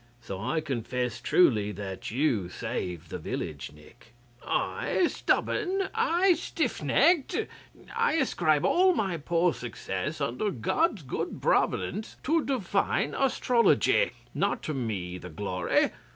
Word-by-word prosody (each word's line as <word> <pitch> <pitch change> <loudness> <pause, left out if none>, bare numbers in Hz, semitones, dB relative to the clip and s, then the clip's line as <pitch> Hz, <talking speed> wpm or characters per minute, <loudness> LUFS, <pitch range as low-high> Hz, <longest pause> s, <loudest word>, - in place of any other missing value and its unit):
So 95 -5 -7
I 160 +9 0
confess 125 -3 -3
truly 110 - +3
that 95 -2 -6
you 120 - 0
saved 90 -2 -5
the - - -4
village, - - -5
Nick.' 115 - -18 0.3
'I 360 - 0
stubborn? 390 +1 0
I 355 +3 +3
stiff 335 - -2
necked? 345 0 +3 0.6
I 465 +1 +2
ascribed 155 - +2
all 370 0 +4
my 195 - 0
poor 170 +2 +1
success, 120 - -4
under 140 - -1
God's 195 - 0
good 130 - -4
providence, 215 +4 0
to 320 +2 +2
Divine 205 -7 0
Astrology. 260 - +3 0.2
Not - - 0
to 155 - -3
me 100 -9 -3
the 90 - -9
glory! 90 +1 0
150 Hz, 125 wpm, -28 LUFS, -, 0.6 s, all